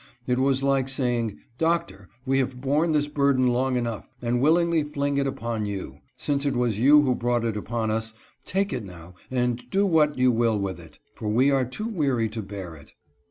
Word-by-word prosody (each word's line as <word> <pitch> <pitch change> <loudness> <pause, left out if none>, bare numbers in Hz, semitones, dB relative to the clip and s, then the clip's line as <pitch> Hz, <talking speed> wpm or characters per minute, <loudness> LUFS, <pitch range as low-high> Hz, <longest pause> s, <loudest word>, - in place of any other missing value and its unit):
It 125 0 0
was 135 0 +2
like 135 -1 +1
saying 120 -5 -1 0.2
"Doctor, 130 - -1 0.2
we 135 0 +2
have 130 -1 -2
borne 145 +5 +1
this 150 -1 +2
burden 140 -3 +2
long 125 +1 +1
enough, 115 -3 -4
and 120 0 0
willingly 165 +2 +3
fling 145 -1 -2
it 140 - +1
upon 115 -5 -3
you. 95 -9 -6 0.2
Since 140 -1 -1
it 140 -2 0
was 120 -4 0
you 145 +4 +6
who 130 -3 +2
brought 120 -1 0
it 115 -2 -1
upon 110 +1 -2
us, 110 0 -2 0.3
take 195 +6 -1
it 125 -4 -3
now 90 -2 -11 0.2
and 125 -1 0
do 195 +8 +2
what 155 -6 +3
you 125 0 +4
will 115 -2 +2
with 95 -3 -3
it, 80 -3 -15 0.2
for 110 - -6
we 125 +6 +3
are 135 -2 +2
too 170 - -5
weary 135 - 0
to 110 +1 -5
bear 95 -4 -7
it." 70 -2 -17
125 Hz, 205 wpm, -25 LUFS, 110-140 Hz, 0.3 s, you